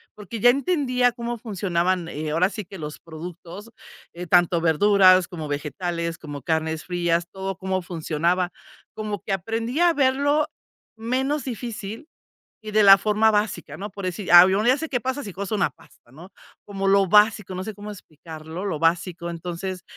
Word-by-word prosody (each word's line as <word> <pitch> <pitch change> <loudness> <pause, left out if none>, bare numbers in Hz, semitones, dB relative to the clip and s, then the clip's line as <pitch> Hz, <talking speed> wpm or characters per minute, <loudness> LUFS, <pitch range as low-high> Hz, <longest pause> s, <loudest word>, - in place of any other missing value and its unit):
porque 215 +2 -8
ya 245 - +6
entendía 255 -3 +2
cómo 235 0 -4
funcionaban, 185 -5 -1
eh, 155 -1 -4
ahora 175 +5 +2
sí 210 -1 -7
que 190 +1 -11
los 150 -1 -7
productos, 175 +6 -10 0.4
eh, 175 +1 -7
tanto 175 -1 +4
verduras 185 +2 +5
como 160 -4 -7
vegetales, 170 +3 -3
como 145 -3 -8
carnes 160 0 -1
frías, 170 -1 0
todo, 190 -1 -5
cómo 190 0 -2
funcionaba, 175 +1 -1 0.4
como 210 -2 -4
que - - -6
aprendí 225 - -3
a 350 -1 +5
verlo 285 +2 +2 0.5
menos 265 +6 -1
difícil 230 +1 -6 0.6
y 215 -1 -7
de 215 0 +4
la 195 -1 +9
forma 215 +2 +2
básica, 210 0 -2
¿no? 200 +2 -5
Por 200 0 -8
decir, 185 +2 -4
al 175 +1 +10
menos 205 +4 +1
ya 255 +2 +5
sé 320 - -4
qué 250 -3 -1
pasa 260 +4 -3
si 200 - -7
coso 200 +3 -4
una 195 -7 +1
pasta, 120 -1 -23
¿no? 170 +7 -13 0.4
Como 195 -1 -2
lo 195 0 +4
básico, 210 -1 +3
no 185 +1 -4
sé 220 - -5
cómo 205 +2 -9
explicarlo, 160 0 -9
lo 175 -6 -2
básico. 170 +1 0
Entonces 175 +2 -5
190 Hz, 175 wpm, -23 LUFS, 170-220 Hz, 0.6 s, al